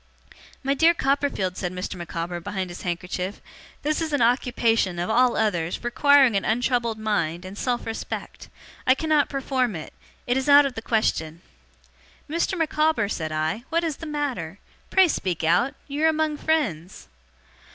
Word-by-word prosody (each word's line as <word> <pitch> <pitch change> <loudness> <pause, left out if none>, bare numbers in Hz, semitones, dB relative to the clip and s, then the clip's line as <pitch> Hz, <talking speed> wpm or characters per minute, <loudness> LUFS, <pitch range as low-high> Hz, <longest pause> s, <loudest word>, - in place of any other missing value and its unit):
'My 275 +1 +1
dear 325 +4 +4
Copperfield,' 275 - 0
said 180 - -3
Mr. 180 +2 -4
Micawber, 175 0 -4
behind 190 0 -4
his 175 - -8
handkerchief, 180 +2 -4 0.4
'this 305 +2 0
is 315 -2 -2
an 290 - +1
occupation, 230 -6 +2
of 175 +5 -2
all 250 +1 +3
others, 175 -5 -1
requiring 270 0 +4
an 195 - +1
untroubled 235 -1 0
mind, 185 -6 -1
and 190 +1 -8
self 240 +2 -2
respect. 225 0 -6 0.4
I 260 - +6
cannot 310 -1 +1
perform 260 -5 -1
it. 155 - -8 0.3
It 245 +1 +1
is 265 +2 -1
out 285 0 +8
of 275 - -2
the 225 - -6
question.' 170 -8 -1 0.8
'Mr. 335 +4 -1
Micawber,' 310 -8 +1
said 160 -5 -3
I, 155 +9 -1
'what 335 +1 +1
is 320 -4 -2
the 325 - -8
matter? 260 - -3 0.3
Pray 380 -1 +5
speak 185 - -2
out. 210 - +2
You 290 +2 -1
are - - +6
among 310 -1 0
friends. 205 - -2
235 Hz, 160 wpm, -24 LUFS, 180-285 Hz, 0.8 s, out